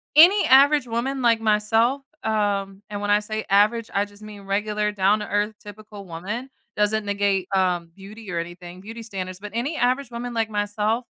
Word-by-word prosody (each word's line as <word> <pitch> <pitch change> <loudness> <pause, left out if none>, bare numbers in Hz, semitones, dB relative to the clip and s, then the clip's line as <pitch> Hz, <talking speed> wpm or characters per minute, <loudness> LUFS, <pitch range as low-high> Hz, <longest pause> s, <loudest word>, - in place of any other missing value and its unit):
any 360 +7 +7
average 280 +1 +5
woman 250 +4 -2
like 230 -2 +3
myself, 225 +5 +2 0.2
um 200 -3 -1
and 205 -1 -5
when 205 0 0
I 205 - +5
say 215 +1 -5
average, 210 +3 +3
I 200 +1 +1
just 205 0 -18
mean 210 -1 -10
regular, 210 +1 -1
down-to-earth, 205 +1 +1
typical 210 -1 -11
woman, 200 +10 -5 0.3
doesn't 210 +1 +1
negate, 200 -2 0
um, 180 -3 0
beauty 200 +1 -10
or 170 - -1
anything 175 +1 -8
beauty 225 +3 -9
standards, 185 -4 -6
but 210 +1 -8
any 265 +7 -1
average 255 +1 +1
woman 240 +1 -5
like 225 -1 0
myself 210 +3 -1
210 Hz, 170 wpm, -23 LUFS, 200-230 Hz, 0.3 s, any